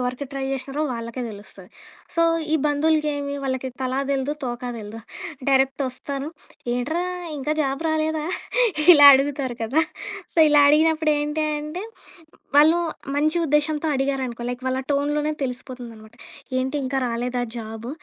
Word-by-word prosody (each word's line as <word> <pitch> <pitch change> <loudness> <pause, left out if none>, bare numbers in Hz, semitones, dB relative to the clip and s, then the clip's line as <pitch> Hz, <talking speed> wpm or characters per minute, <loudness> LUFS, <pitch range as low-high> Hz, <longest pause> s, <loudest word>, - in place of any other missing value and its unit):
ఎవరికి 250 +3 -2
ట్రై 275 -1 -3
జేషారో 270 +3 -3
వాళ్ళకే 235 +2 -5
తెలుస్తది. 200 -2 -12 0.5
సో, 335 - +3 0.3
ఈ - - +5
బంధువులకేమి 295 -1 +1
వాళ్ళకి 260 -1 -2
తలా 260 +1 -1
తెల్దు, 275 +1 0
తోకా 245 0 -4
తెల్దు. 215 +1 -8 0.5
డైరెక్టొస్తారు, 270 +1 0 0.5
"ఏంట్రా 315 +8 -1 0.3
ఇంకా 295 +2 -1
జాబు 275 +3 -1
రాలేదా?" 315 0 0 0.7
ఇలా 290 -2 +9
అడుగుతారు 270 -2 0
కదా! 270 +8 +2 0.5
సో, - - -1
ఇలా 295 -1 +6
అడిగినప్పుడు 315 0 +3
ఏంటి 300 +1 -1 0.2
అంటే, 320 +7 -5 0.7
వాళ్ళు 315 +4 +6 0.4
మంచి 310 +3 +2
ఉద్దేశంతో 300 +1 +1
అడిగారనుకో 265 -3 -2
లైక్ 245 +1 -7
వాళ్ళ 260 0 -1
టోన్‌లోనే 295 +2 0
తెలిసిపోతుందనమాట. 240 -3 -8 0.4
ఏంటి 265 +3 -2
ఇంకా 270 +1 -1
రాలేదా 245 +1 -2 0.2
జాబు, 225 +1 -7
275 Hz, 125 wpm, -23 LUFS, 250-300 Hz, 0.7 s, ఇలా